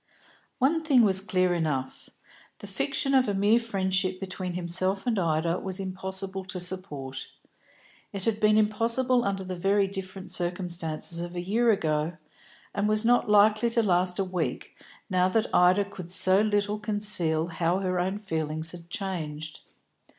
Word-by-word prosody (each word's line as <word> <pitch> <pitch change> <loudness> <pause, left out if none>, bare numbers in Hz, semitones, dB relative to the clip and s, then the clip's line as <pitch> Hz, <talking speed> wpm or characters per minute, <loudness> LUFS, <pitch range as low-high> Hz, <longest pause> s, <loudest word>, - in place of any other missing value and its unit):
One 305 +6 +2
thing 270 -6 +4
was 190 -3 +7
clear 185 -2 +1
enough. 150 -6 -3 0.5
The - - -11
fiction 275 +7 -2
of 260 -2 +4
a 205 - -1
mere 205 +4 +3
friendship 190 -4 -1
between 185 -1 -5
himself 185 +2 -1
and 230 -5 0
Ida 165 0 0
was 190 0 -3
impossible 190 0 -3
to 185 0 -2
support. 150 -8 -3 0.8
It 195 -2 -6
had 220 -2 0
been 215 0 +4
impossible 230 +4 +2
under 195 -2 -2
the 185 0 -5
very 195 +3 +2
different 190 -1 -7
circumstances 175 -2 -2
of 175 +1 -6
a - - -3
year 220 +7 +1
ago, 155 -5 0 0.6
and 205 +1 0
was 215 +1 +1
not 245 -2 +3
likely 215 +2 +4
to 230 0 +1
last 180 -2 +1
a 195 - +1
week, 185 -3 -4 0.3
now 185 -2 +2
that 225 +4 -1
Ida 185 +3 +4
could 185 -3 -10
so 185 +1 +4
little 205 0 0
conceal 205 -7 0
how 170 +1 0
her 185 -1 -1
own 190 +3 -1
feelings 160 -5 -1
had 170 -1 -11
changed. 155 -6 -5
190 Hz, 160 wpm, -27 LUFS, 175-210 Hz, 0.8 s, was